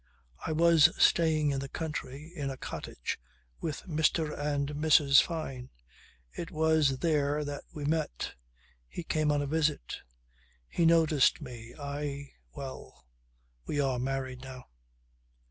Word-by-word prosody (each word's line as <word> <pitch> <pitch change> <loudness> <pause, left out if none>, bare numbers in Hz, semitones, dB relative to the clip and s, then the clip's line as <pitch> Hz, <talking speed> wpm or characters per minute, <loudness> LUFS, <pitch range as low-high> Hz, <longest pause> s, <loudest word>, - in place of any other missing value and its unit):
I - - -1
was 165 -1 +6
staying 155 -3 +4
in 135 - -1
the 135 0 -5
country, 150 -1 -5
in 145 -4 -2
a 135 - -5
cottage, - - -5 0.4
with 155 -3 -4
Mr. 160 -1 +1
and 145 -1 -1
Mrs. 145 -2 +5
Fyne. 135 -7 -5 0.6
It 170 - -5
was 160 -5 +2
there 150 -1 +1
that 145 0 -5
we 150 -2 -5
met. 155 - -1 0.5
He 175 - -6
came 155 -2 +1
on 145 -1 +1
a - - -2
visit. 150 - 0 0.7
He 165 - +2
noticed 160 -4 +4
me. 120 -5 -9
I 140 0 -4 0.2
well 65 -1 -8 0.6
we 145 - -1
are 135 -3 +1
married 130 0 -3
now." 130 -1 -9
145 Hz, 130 wpm, -30 LUFS, 135-160 Hz, 0.7 s, was